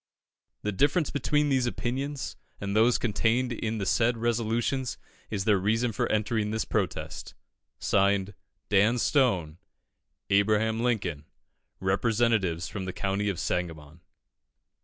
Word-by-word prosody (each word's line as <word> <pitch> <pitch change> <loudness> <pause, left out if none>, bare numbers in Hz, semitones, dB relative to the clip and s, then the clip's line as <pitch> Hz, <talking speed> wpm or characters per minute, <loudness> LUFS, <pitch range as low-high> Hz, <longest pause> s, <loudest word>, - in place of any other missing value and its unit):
The 105 - 0
difference 145 - +2
between 150 +1 +1
these 130 -3 +2
opinions 135 +4 -3 0.2
and 100 0 -3
those 115 +3 +5
contained 120 +3 +1
in 115 -1 -3
the 100 - -2
said 115 +4 +2
resolutions 120 +3 -1 0.3
is 100 -3 -2
their 105 -3 +4
reason 115 +5 +1
for 105 - -1
entering 110 0 0
this 110 0 -1
protest. - - -3 0.4
(Signed) 100 0 +1 0.4
DAN 105 +4 +4
STONE. 95 - +1 0.7
A. 100 +1 +6
LINCOLN. 110 -6 0 0.5
_Representatives 100 -3 +1
from 95 -3 -5
the 95 - -4
County 100 +1 -1
of 95 -4 -3
Sangamon. 80 -2 -3
110 Hz, 120 wpm, -28 LUFS, 95-120 Hz, 0.7 s, A